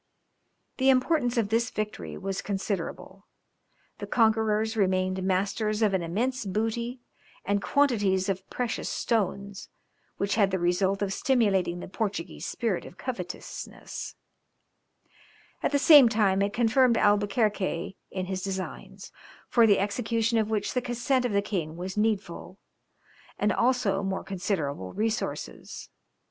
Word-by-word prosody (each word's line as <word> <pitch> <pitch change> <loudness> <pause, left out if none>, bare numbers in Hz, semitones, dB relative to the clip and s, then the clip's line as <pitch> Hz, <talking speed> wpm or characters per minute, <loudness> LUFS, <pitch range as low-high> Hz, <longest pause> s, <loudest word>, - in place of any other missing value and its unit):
The 265 0 +3
importance 255 -1 +2
of 220 -3 +1
this 230 +1 +1
victory 215 0 -5
was 195 0 -3
considerable; 195 -1 -4 0.7
the - - -5
conquerors 220 -1 +2
remained 185 -2 +1
masters 200 +4 0
of 205 -2 +3
an 190 - +1
immense 235 +10 -1
booty 225 +5 -2 0.4
and 200 0 +1
quantities 205 -11 +2
of 190 -1 -3
precious 245 -2 -3
stones, 200 -3 -2 0.5
which 200 0 0
had 200 -3 +3
the 190 - 0
result 190 +3 +1
of 195 -1 -1
stimulating 195 -10 +1
the - - -7
Portuguese 200 -3 -4
spirit 220 -7 -1
of 175 - -12
covetousness; 215 -9 -6 1.5
at - - 0
the 285 - +3
same 285 -4 +8
time 200 -3 +2
it 200 0 +1
confirmed 235 +2 +3
Albuquerque 205 -3 +1
in 185 -1 -3
his 185 0 -3
designs, 190 0 -6 0.4
for 230 -2 +5
the 200 -2 +5
execution 225 +3 0
of 215 -1 0
which 215 -2 -1
the 250 - 0
consent 245 +2 0
of 245 - 0
the 200 0 +1
king 165 -6 -3
was 185 +2 -5
needful, 210 -4 -2 0.8
and 210 -1 +1
also 235 -6 +1
more 195 -1 -2
considerable 160 - -3
resources. 220 +1 -4
205 Hz, 130 wpm, -27 LUFS, 190-230 Hz, 1.5 s, same